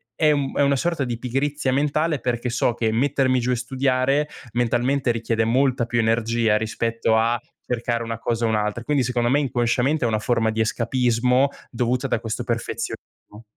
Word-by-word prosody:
è 155 -2 +3
una 140 0 +1
sorta 165 +1 -1
di 120 -2 -3
pigrizia 135 +2 -1
mentale 150 +2 +1
perché 125 0 -2
so 120 0 0
che 115 -2 0
mettermi 130 +1 +2
giù 125 +1 -2
e - - +2
studiare 130 +3 0 0.2
mentalmente 120 +2 +1
richiede 115 -1 -1
molta 125 +1 +2
più 120 0 -1
energia 115 -1 +2
rispetto 110 +1 0
a 115 +2 +2 0.3
cercare 120 -1 -2
una 115 -1 -5
cosa 115 0 -1
e - - +2
un'altra. 105 +1 -1
Quindi 145 -2 +1
secondo 120 -1 0
me 140 +3 +3
inconsciamente 130 +1 +1
è - - +3
una 110 -1 0
forma 115 0 +1
di 110 0 -1
escapismo 125 +3 +1 0.2
dovuta 125 +2 0
da 115 - 0
questo 115 -2 -4
perfezionismo. 105 +2 -5
120 Hz, 170 wpm, -23 LUFS, 115-135 Hz, 0.3 s, è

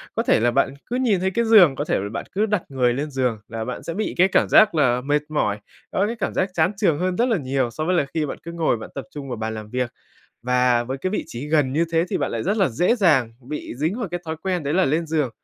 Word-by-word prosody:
Có - - 0
thể - - +3
là 120 +2 +2
bạn 120 - +1
cứ 245 - -4
nhìn 240 -7 +2
thấy 190 +1 0
cái 235 +4 0
giường, 195 -11 +7
có 145 - -2
thể - - 0
là 100 +1 -4
bạn 115 - -4
cứ 210 +3 +1
đặt 210 -4 0
người 125 -3 +1
lên 145 +4 -3
giường 125 -5 -1
là 110 -1 -5
bạn 125 - -5
sẽ 165 - -4
bị 215 +5 -2
cái 185 - +5
cảm 195 - +2
giác 215 -5 +6
là 125 -5 +2
mệt 145 +3 +1
mỏi, 105 -9 0 0.3
có 195 - +1
cái 230 - -3
cảm - - -2
giác 185 - 0
chán 165 +2 +2
chường 170 -8 +2
hơn 180 0 -1
rất 240 - +2
là 225 - +2
nhiều 135 -4 -1
so 155 +6 -4
với 180 +2 +1
là 145 - +2
khi 160 -2 0
bạn 140 - -5
cứ 170 - -7
ngồi 165 -7 0
bạn 110 - -9
tập 140 - -5
trung 145 -2 -7
vào 120 - -4
bàn 110 0 -3
làm 110 -1 -7
việc. 125 0 -2 0.5
Và 125 -1 +2
với 130 +3 -4
cái 185 - -2
vị 210 - -2
trí 120 +5 -7
gần 150 -4 +2
như 160 +4 +2
thế 165 0 +3
thì - - -1
bạn - - -1
lại 115 - -3
rất 200 +4 0
là 195 -6 +3
dễ 175 - +2
dàng 150 - +3 0.2
bị 150 -4 -5
dính 160 - -1
vào 230 -6 -3
cái 175 +1 -4
thói 160 0 -4
quen 185 -3 -1
đấy 145 +1 -1
là 190 +1 +4
lên 160 +5 0
giường. 155 -5 0
150 Hz, 300 wpm, -22 LUFS, 125-185 Hz, 0.5 s, giường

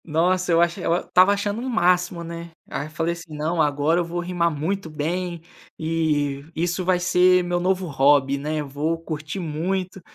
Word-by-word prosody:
Nossa, 180 +3 +1
eu 165 - +4
acho 170 +2 +1
eu 170 -1 +1
estava 185 +2 +4
achando 205 +2 -1
um 260 - -3
máximo, 180 -5 +2
né. 170 0 -7 0.2
Aí, 145 +2 -4
falei 160 +2 -1
assim: 165 -2 -10
"Não, 160 +2 0
agora 150 +3 +2
eu - - +1
vou 170 +1 -4
rimar 175 -1 0
muito 165 +4 -3
bem, 170 +3 -3 0.4
e 150 -3 0
isso 175 +3 -1
vai 180 0 +2
ser 180 0 +4
meu 175 0 -1
novo 185 +1 0
hobby, 140 -2 +3
né, 155 +2 -2
eu 145 - -6
vou 150 +4 -1
curtir 155 +2 -5
muito". 185 +3 -3
170 Hz, 185 wpm, -23 LUFS, 155-180 Hz, 0.4 s, eu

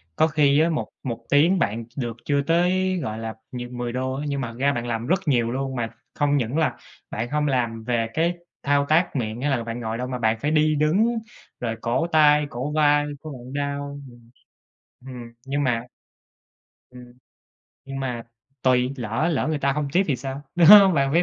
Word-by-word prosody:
Có 160 - +4
khi 150 -2 +3
á, 165 - +3
một 155 - -2
một 115 -3 -5
tiếng 170 +6 +4
bạn 110 -1 -1
được 120 -3 -3
chưa 140 -1 +1
tới, 180 +4 +1
gọi 110 0 -4
là, 115 0 -5 0.2
nh 120 0 -6
10 120 -1 -3
đô 130 +1 -2
á, 145 - -4
nhưng 140 -1 -2
mà 125 - -2
thật - - -13
ra 140 +1 +2
bạn 120 0 -3
làm 115 +1 -3
rất 185 +2 +2
nhiều 120 -4 +2
luôn. 135 0 -3
Mà 115 -2 -2 0.3
không 145 -1 +2
những 125 +4 -1
là 160 - +1 0.3
bạn 115 +3 -3
không 150 0 +1
làm 120 -4 -1
về 115 -1 0
cái 170 +2 +1 0.3
thao 140 0 +2
tác 165 +1 +2
miệng 115 -1 -3
hay 145 - 0
là 120 -3 0
bạn 115 +1 -5
ngồi 115 -1 -3
đâu. 125 +1 -3
Mà 125 -1 -4
bạn 110 0 +1
phải 150 - 0
đi 155 0 +3
đứng 195 +11 +2 0.4
rồi 115 -2 -2
cổ 125 +8 0
tay, 150 -2 +4
cổ 130 +5 -4
vai 145 -1 +3 0.2
của 155 -2 -8
bạn 125 0 -10
đau, 140 0 -3
ừm. 120 -1 -18 0.7
Hừm, 120 -3 -9
nhưng 140 +1 -1
mà 120 -1 0 1.0
Ừm. 125 -1 -13 0.7
Nhưng 135 0 -6
mà 125 -3 -3 0.4
tuỳ, 125 0 +2
lỡ 120 +7 -1
lỡ 155 - 0
người 155 - -1
ta 140 -1 +1
hông 150 0 -2
tip 185 +4 +3
thì 135 - +1
sao, 135 +2 -6
đúng 170 -2 +5
hông? 200 -2 +9
Bạn 135 -1 +1
phải 170 - +4
135 Hz, 210 wpm, -23 LUFS, 120-150 Hz, 1.0 s, hông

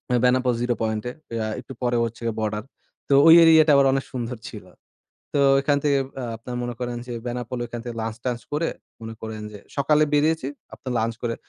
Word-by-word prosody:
এ - - +4
Benapole 125 0 +3
zero 120 0 0
পয়েন্টে। 110 +2 -2 0.3
আ - - -2
একটু 130 +2 -9
পরে 120 -1 +1
হচ্ছে 115 +1 -7
গ্যা 115 - -2
বর্ডার। 105 -1 -2 0.5
তো - - +4
ওই 165 - +10
এরিয়াটা 160 -1 +7
আবার 140 0 +5
অনেক 135 0 -1
সুন্দর 125 -1 -4
ছিল। - - -10 0.7
তো - - +2 0.2
এখান 145 0 +2
থেকে 140 -2 +3 0.2
আ - - -3
আপনারা 120 +2 -7
মনে 120 0 -4
করেন 120 -1 -3
যে - - -4
বেনাপোল 125 +1 -4
ওইখান 120 0 -6
থেকে 120 -2 -6
লাঞ্চ-টাঞ্চ 115 +2 -3
করে, 155 +3 0 0.3
মনে 110 0 -6
করেন 110 -1 -6
যে 105 - -9 0.2
সকালে 150 +2 +3
বেরিয়েছি। 150 -1 +2 0.3
আপনার 130 - -6
লাঞ্চ 115 +1 0
করে 115 -1 -1
125 Hz, 200 wpm, -24 LUFS, 115-140 Hz, 0.7 s, ওই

